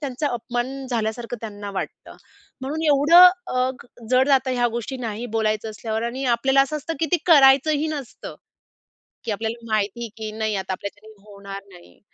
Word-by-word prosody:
त्यांचा 285 0 -2
अपमान 250 +3 -4
झाल्यासारखं 230 +1 -2
त्यांना 205 -2 -7
वाटतं. 195 - -7 0.4
म्हणून 295 +5 -4
एवढं 295 +3 +5
अ, 360 - +11 0.3
अ, 255 +1 +2
क - - -14 0.2
जड 255 +1 +4
जातं 265 -1 +3
ह्या 245 -1 +2
गोष्टी 250 +3 -4
नाही 225 +3 -4
बोलायचं 215 0 0
असल्यावर 220 +1 -4
आणि 255 +3 -3
आपल्याला 265 +3 +3
असं 305 +2 -3
असतं, 310 +3 -5
की 325 - +2
ती - - +6
करायचंही 290 0 +5
नसतं. 285 -5 -7 0.9
की 230 - -3
आपल्याला 225 +3 -4
माहिती 215 +2 -1
की 220 -1 -5
नाही 220 -1 -2
आता 190 0 -3
आपल्याच्यानी 205 +3 -8
होणार 200 -1 -9
नाही. 175 -1 -17
240 Hz, 170 wpm, -23 LUFS, 215-275 Hz, 0.9 s, अ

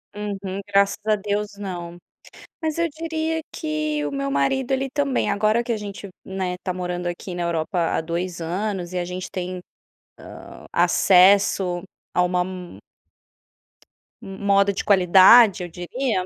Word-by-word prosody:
Uhum. 200 -2 -5
Graças 200 0 +2
a 215 - +4
Deus 205 0 -3
não. 175 -4 -6 0.6
Mas 315 -1 -2
eu 335 0 +1
diria 320 0 -2
que 155 -1 -2
o 145 - -3
meu 140 0 -2
marido 190 - 0
ele 265 0 0
também, 280 -3 0
agora 215 +3 +2
que 240 - -3
a 225 - 0
gente, 205 -1 -7 0.2
né, 190 -1 -3
tá 185 - -2
morando 180 -1 -4
aqui 175 +1 -5
na 175 0 -3
Europa 170 0 -2 0.2
há - - 0
2 170 +2 -4
anos 180 +1 -3
e - - -2
a 175 - -2
gente 180 +1 -6
tem, 185 0 -4 0.8
hã, - - -13
acesso 185 -1 +4 0.3
a 180 - +3
uma 180 0 +1
m 180 - -8 1.4
moda 200 +1 +1
de - - -3
qualidade 190 +2 +6
eu 175 - -6
diria, 185 +4 -2
190 Hz, 150 wpm, -22 LUFS, 175-210 Hz, 1.4 s, qualidade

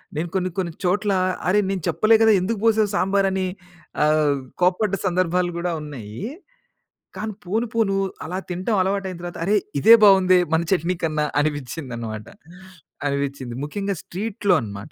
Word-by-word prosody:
నేను 165 +3 -2
కొన్ని 185 -1 0
కొన్ని 175 -3 -1
చోట్లా, 195 +2 +1 0.3
"అరే, 200 +3 +4
నేను 195 -3 -2
చెప్పలే 220 +1 +4
కదా! 225 0 +6
ఎందుకు 205 +3 -2
పోశావు 220 -2 +3
సాంబారని" 190 -1 +1 0.6
ఆహ్, 150 -2 +3 0.2
కోప్పడ్డ 185 +3 +2
సందర్భాలు 180 -1 +1
గూడా 175 +1 -1
ఉన్నయ్యీ, 125 - -7 0.9
కానీ 215 0 -4
పోను 220 +6 -1
పోనూ 215 -4 +1 0.3
అలా 180 +3 -4
తింటం 185 +5 -1
అలవాటయిన 190 -1 -2
తర్వాత, 175 0 -6
అరే, 205 - +2 0.3
ఇదే 225 - +8
బావుందే 190 -2 +6
మన 160 - +3
చట్నీ 180 -1 +1
కన్నా 155 -1 0 0.2
అనిపిచ్చిందనమాట. 125 -7 -4 0.8
అనిపిచ్చింది. 140 -3 -3
ముఖ్యంగా 195 +6 -3
స్ట్రీట్లో 200 0 -1
అనమాట. 100 -2 -8
180 Hz, 135 wpm, -22 LUFS, 155-200 Hz, 0.9 s, ఇదే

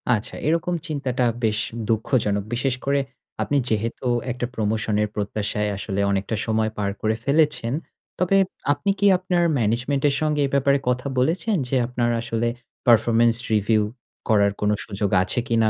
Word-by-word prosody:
আচ্ছা 105 - -4
এরকম 170 +2 +1
চিন্তাটা 130 -5 -1 0.2
বেশ 110 -1 +2 0.3
দুঃখজনক। 110 -3 +1
বিশেষ 125 +1 0
করে 140 0 +2 0.4
আপনি 145 - 0
যেহেতু 115 +3 -2 0.2
একটা 120 0 -3
প্রমোশন 110 0 0
এর - - 0
প্রত্যাশায় 105 +1 -2
আসলে 100 -1 -3
অনেকটা 100 +3 -1
সময় 110 -1 0
পার 100 -1 0
করে 110 0 +1
ফেলেছেন। 145 -4 +2 0.5
তবে 185 +2 +3 0.4
আপনি 145 +7 -3
কি 205 - +2
আপনার 180 -1 0
ম্যানেজমেন্ট 125 +5 0
এর 140 - 0
সঙ্গে 150 -1 +1
এ - - -7
ব্যাপারে 140 0 +3
কথা 125 +2 -1
বলেছেন? 185 - +1
যে 135 - -1
আপনার 120 -1 0
আসলে 120 0 -1 0.4
পারফরম্যান্স 115 0 +5 0.2
রিভিউ 105 +1 +3 0.5
করার 100 -2 +4
কোন 105 - +2 0.2
সুযোগ 100 -1 -2
আছে 115 - -1
কিনা? 115 -2 +3
115 Hz, 155 wpm, -23 LUFS, 110-140 Hz, 0.5 s, পারফরম্যান্স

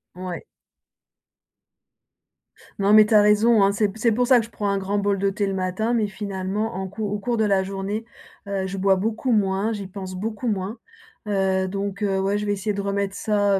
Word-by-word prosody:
Ouais. 185 - -6 2.4
Non 200 +1 +3
mais 215 0 +8
tu 215 - -1
as 210 - +8
raison, 210 +1 +4
heu, - - +2
c'est 205 0 0
c'est 230 +1 +2
pour 245 +3 +2
ça 250 -1 +6
que 225 - -2
je - - -15
prends 205 -3 -3
un 200 0 0
grand 200 +2 -2
bol 200 -1 0
de 200 0 +2
thé 200 +1 -1
le 195 - -2
matin, 190 +5 -1
mais 220 -3 +1
finalement, 200 +2 -3
en 190 0 -3
cours 205 +1 -4
au 205 - -2
cours 235 +2 -1
de 220 - +2
la 195 -2 +3
journée, 195 +3 -4 0.4
heu, 195 -1 -2
je 195 +1 -5
bois 195 0 +3
beaucoup 220 +6 -1
moins, 205 +1 +1
j'y 200 -2 -5
pense 185 -1 -7
beaucoup 220 +5 -4
moins, 205 +2 -2 0.5
heu, 190 -2 +1
donc 200 +1 -4
heu, 195 -2 +1
ouais, 195 +2 +1
je 210 - -3
vais 205 - +1
essayer 205 +1 -2
de 200 - -3
remettre 200 0 -2
ça 205 -2 +1
200 Hz, 215 wpm, -23 LUFS, 195-215 Hz, 2.4 s, mais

